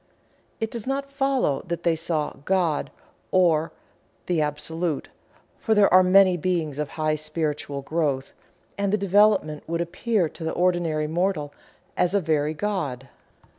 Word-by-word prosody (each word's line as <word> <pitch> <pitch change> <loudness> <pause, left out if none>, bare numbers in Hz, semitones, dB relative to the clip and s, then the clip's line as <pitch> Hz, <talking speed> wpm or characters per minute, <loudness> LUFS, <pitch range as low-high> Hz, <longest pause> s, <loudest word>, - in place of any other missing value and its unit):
It 225 0 -2
does 235 0 -5
not 275 +1 -2
follow 270 - +1
that 170 -1 -4
they 170 -1 +2
saw 160 -2 -2
"God" 175 -4 0 0.4
or 165 -4 +3 0.5
the 175 -3 +1
Absolute, 150 +2 -3 0.5
for 220 - +1
there 205 -3 +4
are 185 - +9
many 185 0 +5
Beings 160 -4 -1
of 150 -2 -2
high 155 -1 +1
spiritual 155 -2 -3
growth 140 -3 -1 0.5
and 200 +1 +1
development 200 -6 +3
that - - -18
would 170 0 0
appear 180 +2 0
to 165 - -10
the 160 - -2
ordinary 175 -4 +1
mortal 160 -2 -1 0.4
as 180 +2 +1
a - - +4
very 155 -3 0
God. 150 -9 -3
170 Hz, 145 wpm, -24 LUFS, 155-190 Hz, 0.5 s, are